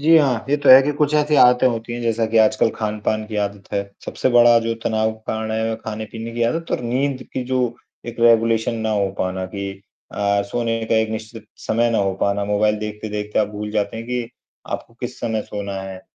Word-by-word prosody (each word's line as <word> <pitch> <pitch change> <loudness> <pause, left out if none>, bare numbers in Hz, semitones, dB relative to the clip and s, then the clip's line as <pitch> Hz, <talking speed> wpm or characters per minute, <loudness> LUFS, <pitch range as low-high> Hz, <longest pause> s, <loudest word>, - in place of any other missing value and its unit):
जी, 160 +3 +6
हाँ 130 -6 +1
ये 145 - +3
तो 145 - 0
है 130 +1 +11
कि 145 +2 0
कुछ 145 0 0
ऐसी 150 0 +2
आदतें 125 0 +6
होती 115 -1 -2
हैं 120 - -4
जैसा 115 -1 +1
कि 115 +1 -1
आजकल 110 +1 +4
खान-पान 110 0 -2
की 105 0 -6
आदत 100 -1 -2
है। 100 -1 0 0.2
सबसे - - -1
बड़ा 120 -1 +6
जो 115 0 -2
तनाव 110 0 +1
का 110 - -17
कारण 110 0 -3
है 110 0 -1
खाने-पीने 110 +1 -6
की 120 - -1
आदत 165 +9 -1
और - - 0
नींद 130 +2 -1
की 130 - -2
जो 130 +1 -1 0.5
एक 120 - -6
रेगुलेशन 115 0 +3
ना - - 0
हो 100 -2 +1
पाना 95 0 -2
कि 100 +1 -5 0.4
अ, 100 0 +1
सोने 115 +1 -2
का 115 - 0
एक 110 0 +2
निश्चित 110 0 -7
समय 115 +1 0
ना 115 - +1
हो 100 -1 +1
पाना। 100 0 +1
मोबाइल 105 +1 +1
देखते-देखते 105 0 -4
आप 105 -1 +2
भूल 105 0 -6
जाते 105 +1 -1
हैं 115 +1 -7
कि, 125 -1 -3 0.4
आपको - - -6
किस - - -5
समय 110 -2 -1
सोना 100 -1 -6
है। 95 -1 -8
110 Hz, 220 wpm, -21 LUFS, 105-120 Hz, 0.5 s, है